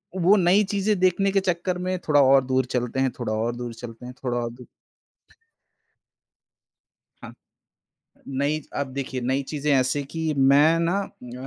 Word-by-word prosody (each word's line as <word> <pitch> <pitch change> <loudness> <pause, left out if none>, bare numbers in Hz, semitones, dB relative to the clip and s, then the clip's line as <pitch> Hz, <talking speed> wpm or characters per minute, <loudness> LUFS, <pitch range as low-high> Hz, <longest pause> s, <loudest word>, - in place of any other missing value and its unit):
वो 190 +3 +4
नई 190 +2 +4
चीज़ें 205 +1 +1
देखने 185 +2 +2
के 195 - +3
चक्कर 180 -1 -1
में 185 0 -1
थोड़ा 145 -2 +5
और 135 0 +5
दूर 130 0 +1
चलते 125 +1 -2
हैं, 130 -1 +1
थोड़ा 115 -3 -2
और 115 +2 -1
दूर 120 -1 -6
चलते 115 +1 -10
हैं 125 - -8
थोड़ा 120 -1 -1
और 120 -1 -3
दू 125 +1 -13 2.6
हाँ। - - -9 1.0
नई 140 +3 -1 0.2
अब 140 - -1
देखिए 130 -1 -4
नई 130 +3 -1
चीज़ें 150 -1 -2
ऐसी 130 +1 +2
है 140 - -3
कि 160 -1 -2
मैं 145 +5 +5
ना 175 +4 +1 0.2
उम, 125 +2 -8
140 Hz, 170 wpm, -24 LUFS, 125-170 Hz, 2.6 s, थोड़ा